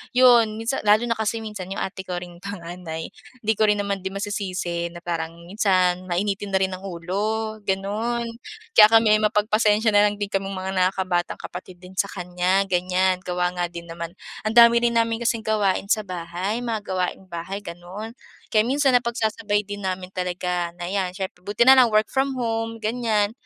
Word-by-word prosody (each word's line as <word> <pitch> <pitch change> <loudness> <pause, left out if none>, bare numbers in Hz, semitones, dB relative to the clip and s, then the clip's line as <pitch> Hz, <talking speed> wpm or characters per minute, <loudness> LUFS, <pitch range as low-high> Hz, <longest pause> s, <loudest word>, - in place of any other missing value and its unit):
'yon, 240 -4 +6
minsan 225 +4 -2
lalo 215 +3 +5
na 230 -2 -1
kasi 220 +1 -1
minsan 210 -4 -6
yung 195 - -3
ate 190 0 -6
ko 180 - -3
ring 175 -1 -7
panganay 175 -3 -7 0.3
hindi 220 - +2
ko 215 - +5
rin 210 - +4
naman 200 -1 -2
din 190 +1 -6
masisisi 185 -4 -3
na 170 0 -11
parang 165 -1 -3
minsan 185 -1 +1
mainitin 195 +3 -1
na - - +6
rin 190 - 0
ang 185 +1 -7
ulo, 210 +5 -2
gano'n. 210 +5 -1 0.5
Kaya 210 -1 +9
kami 220 -1 +5
mapagpasensya 215 +1 +2
na 205 0 +5
lang 205 - -2
din 205 0 -4
kaming 195 0 -2
mga 185 +1 -4
nakakabatang 185 -1 0
kapatid 180 +1 -8
din 185 +1 -13
sa 200 - +2
kanya 180 +1 0
ganyan, 185 +1 +2
gawa 180 -1 -1
nga 175 -1 -2
din 170 0 -8
naman 170 +1 -7 0.3
ang 220 - -2
dami 235 0 +8
rin 235 0 +1
namin 230 0 +2
kasing 230 -2 0
gawain 205 -2 0
sa 215 -3 +1
bahay, 180 +6 -3
mga 230 -3 -1
gawaing 185 0 -2
bahay, 180 +3 -5
gano'n. 200 +4 -8 0.4
Kaya 215 +1 +3
minsan 275 +1 +3
napagsasabay 220 -4 0
din 205 0 -7
namin 185 -1 -4
talaga 180 -1 -2
na 175 - -8
'yan 190 -2 -1
syempre 190 -2 -5
buti 205 +5 +1
na 265 - +10
lang 255 -2 +7
work 215 0 +2
from 270 0 0
home 225 -2 -2
ganyan, 220 -2 +1
200 Hz, 185 wpm, -23 LUFS, 180-220 Hz, 0.5 s, na